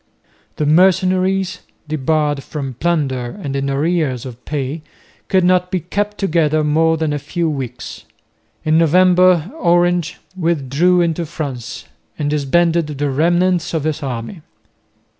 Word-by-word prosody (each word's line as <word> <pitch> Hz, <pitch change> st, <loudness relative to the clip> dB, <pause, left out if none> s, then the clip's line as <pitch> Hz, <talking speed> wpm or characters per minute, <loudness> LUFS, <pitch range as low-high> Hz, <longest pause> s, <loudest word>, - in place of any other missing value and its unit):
The 150 Hz, -, -1 dB
mercenaries, 185 Hz, +3 st, +2 dB, 0.3 s
debarred 150 Hz, -1 st, 0 dB
from 135 Hz, -1 st, -6 dB
plunder 135 Hz, -, -2 dB
and 140 Hz, -2 st, -3 dB
in 140 Hz, 0 st, -1 dB
arrears 145 Hz, -3 st, 0 dB
of 125 Hz, -1 st, -10 dB
pay, 145 Hz, +1 st, -3 dB, 0.5 s
could 190 Hz, -1 st, +2 dB
not 180 Hz, 0 st, +2 dB
be 185 Hz, -1 st, -1 dB
kept 205 Hz, +4 st, -3 dB
together 155 Hz, -5 st, +1 dB
more 160 Hz, +2 st, +2 dB
than 155 Hz, -2 st, -1 dB
a 145 Hz, -, -2 dB
few 170 Hz, +3 st, -2 dB
weeks. 130 Hz, -5 st, -6 dB, 0.6 s
In 155 Hz, +1 st, +3 dB
November 180 Hz, +1 st, +4 dB
Orange 175 Hz, -1 st, +2 dB, 0.2 s
withdrew 170 Hz, +1 st, +1 dB
into 170 Hz, -1 st, -1 dB
France 140 Hz, -7 st, -6 dB, 0.3 s
and 145 Hz, -1 st, -1 dB
disbanded 165 Hz, +3 st, +1 dB
the 145 Hz, -1 st, -2 dB
remnants 175 Hz, +4 st, +1 dB
of 155 Hz, -, -1 dB
his 155 Hz, -1 st, -2 dB
army. 130 Hz, -, -5 dB
160 Hz, 130 wpm, -18 LUFS, 145-175 Hz, 0.6 s, November